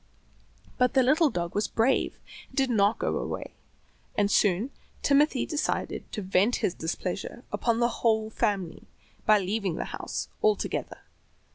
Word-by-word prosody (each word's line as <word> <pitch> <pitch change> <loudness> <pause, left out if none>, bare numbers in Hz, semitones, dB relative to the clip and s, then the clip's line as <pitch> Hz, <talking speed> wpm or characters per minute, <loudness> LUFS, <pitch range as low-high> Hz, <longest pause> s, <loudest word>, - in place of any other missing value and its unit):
But 250 +1 +3
the 260 - +6
little 305 +5 +4
dog 170 -6 -3
was 205 - 0
brave 230 +4 +1 0.3
and - - -19
did 265 -2 +2
not 205 -1 +3
go - - -1
away, - - -5 0.6
and 205 0 +2
soon 205 +7 +2 0.3
Timothy 285 -1 +3
decided 300 -2 -2
to 210 - -4
vent 190 +5 +2
his 175 - 0
displeasure 180 +8 -4
upon 235 -1 +1
the 240 - +4
whole 220 -1 +2
family 200 -7 -2 0.4
by 215 -1 +7
leaving 195 -2 -1
the - - -3
house - - -4
altogether. 430 -1 0
220 Hz, 145 wpm, -27 LUFS, 195-255 Hz, 0.6 s, by